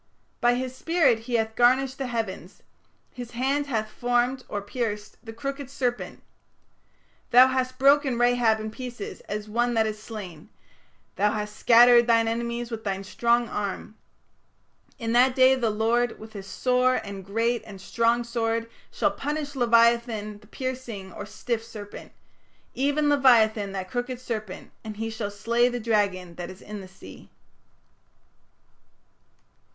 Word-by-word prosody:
By 240 0 +3
his 255 0 -4
spirit 285 -5 +2
he 235 +2 -4
hath 220 -1 0
garnished 260 +2 +3
the 270 - -2
heavens: 220 -6 -5 0.5
his 245 -2 -7
hand 275 +4 0
hath 220 -5 -1
formed 245 +2 0
(or 205 - -2
pierced) 210 0 -4
the 225 - -8
crooked 275 +3 -5
serpent"; 250 -3 -3 1.1
"Thou 255 +2 +7
hast 255 0 -1
broken 275 -1 +4
Rahab 240 -2 +3
in 215 0 -5
pieces 245 -3 -7
as 210 +1 -4
one 240 +2 0
that 220 -1 +3
is 215 -1 -4
slain: 195 -9 -9 0.7
thou 205 +2 +3
hast 210 0 -4
scattered 240 +1 +6
thine 230 -1 +4
enemies 235 +1 -3
with 225 -1 -5
thy 195 -2 -2
strong 235 +4 +1
arm"; 205 0 -4 1.0
"In 230 -3 -3
that 250 +1 +4
day 260 0 +6
the 245 -4 0
Lord 225 +3 +1
with 220 0 -12
his 195 -2 -8
sore 250 +3 +2
and 200 -1 -5
great 230 +4 0
and 205 -3 -11
strong 230 +4 +1
sword 230 -1 -2 0.2
shall - - +1
punish 290 0 -4
leviathan 235 -4 +2
the 210 - -20
piercing 240 -7 -6
(or 205 - -7
stiff) 230 +1 -3
serpent, 210 -3 -10 0.6
even 285 +3 +1
leviathan 230 -8 +4
that 185 -1 -5
crooked 245 0 -3
serpent; 215 -6 -6
and 215 -2 -7
he 225 +1 -3
shall 220 -2 -4
slay 235 +4 +1
the 245 0 -3
dragon 200 -6 0
that 175 -1 -6
is 185 0 -12
in 210 -1 -7
the 190 - -10
sea". 190 +1 -14
235 Hz, 150 wpm, -26 LUFS, 215-250 Hz, 1.1 s, Thou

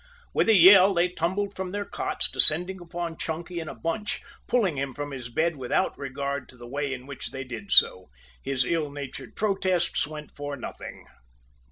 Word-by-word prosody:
With - - +2
a 220 - +7
yell, 190 +1 +8
they 175 +1 +3
tumbled 190 +4 -2
from 190 -1 -4
their 205 +2 -3
cots, - - 0
descending 180 +4 +3
upon 170 -1 -5
Chunky 170 +2 -4
in 160 - -5
a - - -7
bunch, 210 +7 -2 0.3
pulling 210 -10 +2
him 135 -1 -3
from 145 0 -5
his 125 -3 -6
bed 160 +5 0
without 125 -2 0
regard 140 0 -4
to 125 - -14
the 120 0 -10
way 140 +2 -2
in 130 -1 -6
which 140 -1 -7
they 135 0 -6
did 135 +11 -8
so. 90 0 +5 0.3
His 130 - 0
ill 160 0 0
natured 140 -2 -8
protests 190 -6 0
went 150 -1 -9
for 145 0 -5
nothing. 125 - -8
160 Hz, 185 wpm, -26 LUFS, 140-185 Hz, 0.3 s, yell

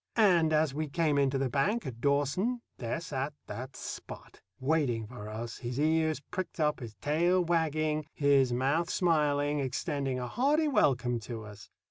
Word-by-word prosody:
And 175 -8 +4
as 155 -2 +2
we 155 +2 -2
came 150 -1 +1
in 140 -1 +3
to 135 - -1
the 135 0 0
bank 170 - 0
at 120 -4 -7
Dawson, 145 - +1 0.2
there 120 +5 -2
sat 145 -3 -3
that 130 +2 -7
Spot, - - -8 0.2
waiting 130 -6 +1
for 105 -2 -9
us, 115 +2 -6
his 125 +1 -4
ears 160 0 +2
pricked 180 +5 -6
up, 150 -1 +1
his 115 -4 -8
tail 165 - +2
wagging, 155 -2 0
his 140 -3 +4
mouth 140 +8 +1
smiling, 150 -4 +2
extending 135 0 -2
a 125 -1 -3
hearty 290 - +2
welcome 130 - +2
to 115 0 -7
us. 105 -1 -12
145 Hz, 165 wpm, -30 LUFS, 130-160 Hz, 0.2 s, And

